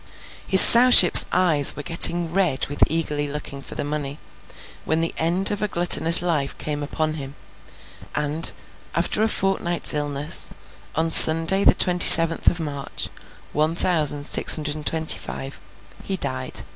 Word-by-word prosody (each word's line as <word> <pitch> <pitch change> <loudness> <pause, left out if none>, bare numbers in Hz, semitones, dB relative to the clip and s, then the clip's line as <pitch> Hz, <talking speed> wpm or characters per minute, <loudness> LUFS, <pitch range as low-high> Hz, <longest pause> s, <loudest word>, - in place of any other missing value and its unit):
His 190 -1 +5
Sowship's 235 -7 +7
eyes 165 -6 +2
were 145 - -11
getting 170 0 -1
red 180 -8 -4
with 145 - -10
eagerly 150 -2 -6
looking 140 -1 -11
for - - -14
the - - -6
money, 145 -1 -9 0.7
when 160 +1 -4
the 165 0 -4
end 175 +5 -3
of 205 - -8
a 210 - -4
gluttonous 175 -2 +2
life 150 -6 -6
came 150 -1 -8
upon 155 +2 -7
him; 135 +1 -12 0.8
and, 150 +2 -2 0.4
after 215 - -4
a 220 - -1
fortnight's 195 -4 -3
illness, 145 +1 -6 0.5
on 165 0 -5
Sunday 165 +5 +5
the - - +1
twenty 180 -1 +1
seventh 165 0 +7
of 175 - -1
March, 145 -3 -9 0.4
one 155 +2 -4
thousand 150 -5 -3
six - - +2
hundred 150 -2 -6
and 150 -1 -10
twenty 160 -1 -3
five, 135 +1 -11 0.4
he 195 - -7
died. 130 -5 -5
160 Hz, 155 wpm, -18 LUFS, 145-175 Hz, 0.8 s, Sowship's